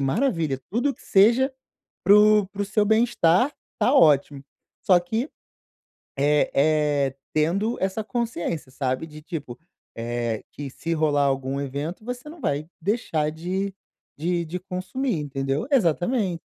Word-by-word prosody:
maravilha, 160 - 0
tudo 245 +7 +1
que - - -21
seja 235 +7 +4 0.5
para 195 +3 +7
o 210 -1 +5
para 200 +1 -6
o - - 0
seu 210 +1 +1
bem-estar, 220 - +3 0.3
tá 255 - +3
ótimo. 145 - +4 0.4
Só 180 -2 +5
que, 225 - -2 0.9
eh 145 +2 +3
eh, 145 -2 +2 0.2
tendo 190 +9 +1
essa 195 +3 -1
consciência, 195 - -3
sabe, 130 +3 -2
de 155 -1 -12
tipo, 150 -7 -6 0.4
eh, 115 -1 -3
que 145 -1 -7
se 165 +5 -5
rolar 150 -3 +2
algum 135 0 -1
evento, 145 +8 -4
você 250 +3 -6
não 325 0 -12
vai 145 - -1
deixar 160 -7 0
de 185 +5 -3 0.4
de 170 +2 0
de 180 +3 -5
consumir, 185 +5 -3
entendeu. 135 - -2
Exatamente. 185 - +1
170 Hz, 140 wpm, -24 LUFS, 145-215 Hz, 0.9 s, para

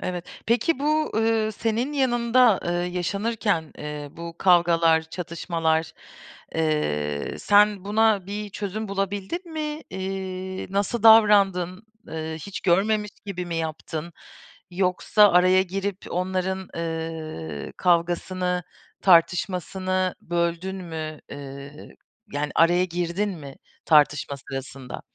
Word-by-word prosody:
Evet. 180 -1 -4 0.2
Peki 240 +6 +2
bu, 305 +2 +1
eee, 220 -1 +1
senin 230 +6 -1
yanında, 240 -4 +3
eee, 175 - -1 0.2
yaşanırken, 200 -1 -1
eee, 150 -1 -6
bu 170 0 -9
kavgalar, 170 -3 +4
çatışmalar, 165 -1 -2 0.6
eee, 75 - -1
sen 205 -1 +4
buna 210 -2 +2
bir 205 +1 -5
çözüm 205 +1 -4
bulabildin 200 - -3
mi? 305 0 -4
Eee, 190 0 -4
nasıl 205 +3 -1
davrandın? 200 -4 +5 0.3
Eee, 160 0 -4
hiç 195 +5 -6
görmemiş 210 +3 +2 0.2
gibi 180 -3 -4
mi 170 -1 -3
yaptın? 160 +1 -4 0.6
Yoksa 190 +3 +3
araya 185 +1 +5
girip 195 +1 -3
onların, 185 +1 -2
eee, 160 - -5
kavgasını, 180 +1 0 0.4
tartışmasını 185 +1 +2
böldün 170 +2 -2
mü, 160 -4 -6
eee, 140 +1 -10 0.4
yani, 145 +1 -2
araya 175 +2 +4
girdin 175 +3 -2
mi 140 -2 -10 0.3
tartışma 145 -2 +3
sırasında? 135 -1 -7
185 Hz, 105 wpm, -24 LUFS, 165-205 Hz, 0.6 s, davrandın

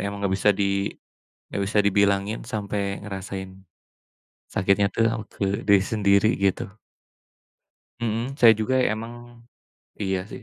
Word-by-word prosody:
Emang 100 0 -4
enggak 95 - +1
bisa 105 - +3
di 100 0 0 0.6
enggak 100 - -2
bisa 105 - 0
dibilangin 100 +1 +2
sampai 100 -3 -3
ngerasain 95 -1 -6 1.0
sakitnya 100 +1 +2
tuh 115 - +2
au 110 - -3
ke 100 0 -3
diri 100 -1 +6
sendiri 100 -1 +3
gitu. 100 -1 0 1.3
Hmm, 115 +3 -2
saya 120 -5 +7
juga 120 +4 0
emang 120 +1 -4 0.6
iya, 95 -2 0
sih. - - -9
100 Hz, 125 wpm, -24 LUFS, 100-110 Hz, 1.3 s, saya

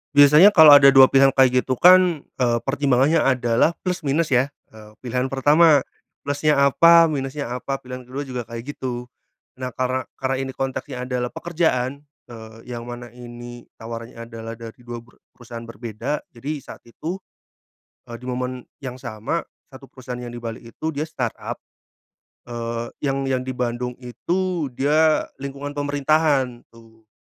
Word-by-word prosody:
Biasanya 150 +8 +7
kalau 160 -4 +9
ada 140 -1 +9
2 135 -1 +8
pilihan 135 0 +5
kayak 130 -1 +4
gitu 130 - -1
kan, 180 0 +5 0.2
eee, 120 -2 +2
pertimbangannya 140 +2 +2
adalah 130 +3 +2
plus 180 -1 -2
minus 150 +2 0
ya, 125 +2 +3 0.2
eee, 110 -1 -14
pilihan 125 +1 -1
pertama, 145 +2 +4 0.4
plusnya 145 +2 +1
apa 165 +4 +6
minusnya 135 -2 -4
apa 135 +1 -4
pilihan 125 0 -9
ke-2 135 +3 -5
juga 130 -3 -5
kayak 115 +4 -7
gitu. 125 -1 -5 0.5
Nah 130 0 -4
karena 130 0 -1 0.2
karena 135 0 -1
ini - - -5
konteksnya 130 -1 -4
adalah 125 -1 -2
pekerjaan, 155 -5 -1 0.3
eee, 110 -1 -11
yang 120 0 -6
mana 120 -1 -8
ini 120 0 -11
tawarannya 115 +1 -8
adalah 115 0 -8
dari 115 0 -11
2 120 0 -7
peru 120 - -23 0.2
perusahaan 120 -1 -9
berbeda 115 +5 -5
jadi 125 +5 -6
saat - - -11
itu, 165 +10 -6 0.9
eee, 120 - -8
di 125 - -12
momen 125 0 -4 0.2
yang 130 -2 -7
sama 120 +5 -4 0.3
satu 135 0 -13
perusahaan 125 -1 -8
yang 120 - -7
di 120 - -8
Bali 115 -1 -7
itu 155 +7 -6
dia 145 - -2
startup, 130 -7 -4 0.9
eee, 115 -1 -5
yang 135 -1 -1
yang 130 -1 -1
di 130 - -4
Bandung 125 0 -3
itu 170 - -2
dia 155 +3 +3 0.2
lingkungan 140 +1 -6
pemerintahan 145 -3 +1
tuh. 115 -1 -20
130 Hz, 155 wpm, -22 LUFS, 120-145 Hz, 0.9 s, kalau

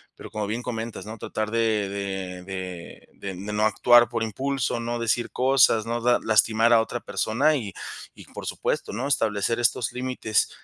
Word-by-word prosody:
pero - - -11
como 105 -1 -3
bien 115 +4 -3
comentas, 115 -3 -5
¿no?, 110 +1 -8
tratar 110 0 -3
de 110 -3 +1
de 95 -2 -4
de 95 -2 -7
de 95 -1 -7
de 100 +3 -6
no 105 +1 +1
actuar 120 +1 +5
por 115 -2 -1
impulso, 130 +2 -1
no 120 0 -2
decir 115 +1 0
cosas, 125 -4 +4
no 120 +1 -2
da 120 +1 +4
lastimar 110 +2 +4
a 115 - +6
otra 120 +2 -4
persona 135 +7 +1
y 105 -7 -5 0.4
y - - -13
por - - -7
supuesto, - - -2
¿no?, 120 +6 -3
establecer 115 -4 +1
estos 115 -1 +1
límites, 125 -4 0
115 Hz, 180 wpm, -25 LUFS, 105-120 Hz, 0.4 s, a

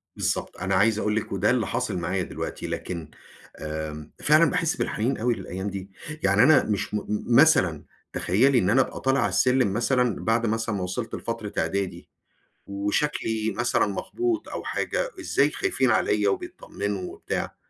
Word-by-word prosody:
بالضبط - - -2
أنا 95 +1 -1
عايز 110 +3 +3
أقول 105 -1 0
لِك، 110 - -2
وده 100 +1 +1
اللي 120 -5 +1
حاصل 120 -4 -2
معايا 90 +2 -1
دلوقتي، - - -5
لكن 85 -4 -5 0.5
آمم 75 -1 -5
فعلًا 155 +2 +5
باحس 165 -3 0
بالحنين 120 +6 -1
أوي 120 +2 +1
للأيام 95 0 -5
دي. 95 0 -7 0.3
يعني 100 +3 +4
أنا 155 +3 +6
مش 105 -1 -2
م - - +2
م - - -5 0.3
مثلًا، 130 - +4 0.3
تخيَّلي 125 +8 +3
إن 95 - +1
أنا 130 +5 +5
أبقى - - -3
طالع 135 +1 +2
على 105 -5 +2
السلم 125 +2 +2
مثلَا 120 +1 +1
بعد 115 +1 +2
مثلَا 115 0 -1
ما 95 - -2
وصلت 90 +6 -4
لفترة 115 -3 -5
إعدادي، 100 -1 -2 0.6
وشكلي 110 +2 -1
مثلَا 120 +1 +2
مخبوط 335 - -2
أو - - -5
حاجة. - - -2
إزاي 150 - +2
خايفين 130 -3 0
عليَّ 105 -1 +2
وبيتطمنوا 100 -1 -3
وبتاع، - - -4
110 Hz, 165 wpm, -25 LUFS, 95-125 Hz, 0.6 s, أنا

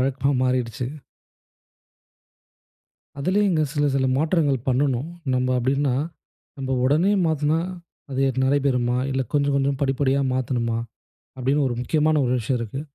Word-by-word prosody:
வழக்கமா 135 +1 +1
மாறிடுச்சு. 125 -2 -1 2.3
அதிலேயும் 195 +7 +2
இங்க 155 -2 +2
சில 145 0 +2
சில 130 -1 +2
மாற்றங்கள் 150 -5 +1
பண்ணனும். 130 +1 +1 0.3
நம்ப 130 0 +1
அப்படின்னா, 135 +2 +1 0.6
நம்ம 130 -1 -2
உடனே 155 +9 +3
மாத்துனா 155 0 +1 0.5
அது 135 0 0 0.2
நடைபெறுமா, 130 -3 +1
இல்ல 130 0 0
கொஞ்சம் 145 -1 +2
கொஞ்சம் 135 0 0
படிப்படியா 135 0 +1
மாத்தணுமா? 120 -3 -1 0.6
அப்படின்னு 135 +3 +1
ஒரு 120 - -2
முக்கியமான 155 +4 +2
ஒரு 125 - +1
விஷயம் 125 +2 -1
இருக்கு. 115 +4 -4
135 Hz, 120 wpm, -23 LUFS, 125-145 Hz, 2.3 s, உடனே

